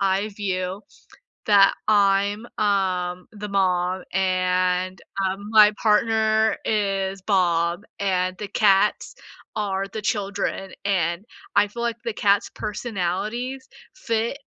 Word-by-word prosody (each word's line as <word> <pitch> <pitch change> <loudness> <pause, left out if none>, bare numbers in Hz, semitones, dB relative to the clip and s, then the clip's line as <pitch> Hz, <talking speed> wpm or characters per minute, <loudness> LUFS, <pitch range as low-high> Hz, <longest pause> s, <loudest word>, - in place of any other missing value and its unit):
I 195 +2 +1
view 190 -1 -3 0.6
that 200 -2 +5
I'm, 205 +1 +2
um, 185 -3 0
the 210 -1 -7
mom 185 -1 0
and, 185 0 0 0.3
um, 195 +2 -3
my, 210 -1 +7
partner 220 0 +2
is 195 -2 -1
Bob 175 -2 +1 0.2
and 185 -2 0
the 210 - -4
cats 205 0 +2 0.4
are 195 -2 -1
the 215 +1 -6
children 200 -2 -2
and 175 -1 0 0.3
I 205 - +5
feel 235 +3 -6
like 235 -1 -1
the 230 -2 -3
cats' 205 0 +2
personalities 215 +5 -3 0.3
fit 230 -5 -2
200 Hz, 110 wpm, -23 LUFS, 185-215 Hz, 0.6 s, my